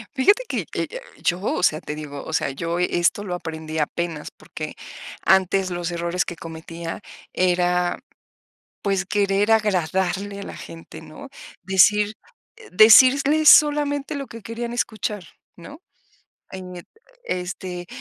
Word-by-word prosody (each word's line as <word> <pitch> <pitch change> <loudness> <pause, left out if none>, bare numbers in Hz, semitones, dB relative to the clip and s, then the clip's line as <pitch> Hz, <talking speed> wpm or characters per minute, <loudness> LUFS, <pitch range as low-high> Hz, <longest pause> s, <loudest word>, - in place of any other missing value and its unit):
Fíjate 405 - +4
que, - - -2
eh - - -2
eh, - - -7 0.2
yo, 175 0 +1
o 200 - -2
sea, 155 -3 +2
te 150 - -6
digo, 145 -2 -7
o 160 - -7
sea, 140 - 0
yo 165 +5 -3
e 180 0 0
esto 175 +4 +1
lo 180 -3 -4
aprendí 160 -2 -6
apenas. 160 0 -3
Porque - - -8 0.5
antes 190 0 +3
los 175 -1 -3
errores 170 +1 -1
que 175 - -6
cometía 165 +1 -8 0.3
era, 180 -1 +1 0.8
pues, 195 -1 0
querer 200 +1 +1
agradarle 195 -1 0
a - - -6
la - - -8
gente, 165 -1 -11
¿no? 160 - -12 0.3
Decir 205 +3 +4 0.5
eh 445 0 -15
decirles 275 +9 +7
solamente 290 -1 +4
lo 275 -1 -5
que 230 -1 -11
querían 235 +2 -5
escuchar, 215 -4 -3 0.3
¿no? 285 - -12 0.7
En 180 -2 -9 0.4
este, 180 - -5
185 Hz, 140 wpm, -22 LUFS, 170-220 Hz, 0.8 s, decirles